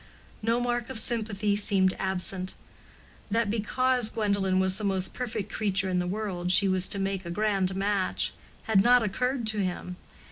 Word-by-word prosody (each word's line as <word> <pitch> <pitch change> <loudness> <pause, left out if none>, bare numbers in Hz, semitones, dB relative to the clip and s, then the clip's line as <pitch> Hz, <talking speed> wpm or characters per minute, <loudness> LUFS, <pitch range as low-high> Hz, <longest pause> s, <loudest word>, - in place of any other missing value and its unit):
No 230 +2 +1
mark 240 -1 -2
of - - -5
sympathy 215 -3 +1
seemed 195 -2 +2
absent. 190 0 -1 0.7
That 225 0 0
because 245 +2 +2
Gwendolen 200 -4 0
was 190 +1 +1
the - - -6
most 190 -2 -1
perfect 215 -5 -5
creature 195 -3 0
in 180 -1 0
the 180 - -2
world 185 -3 -3
she 195 +2 +5
was 185 -1 +1
to - - -1
make 195 -1 -2
a 170 - -7
grand 195 0 0
match, 195 -1 0 0.3
had 210 -4 +3
not 245 +2 +5
occurred 250 +4 -1
to 215 -1 0
him. 180 -1 -3
200 Hz, 170 wpm, -27 LUFS, 190-220 Hz, 0.7 s, she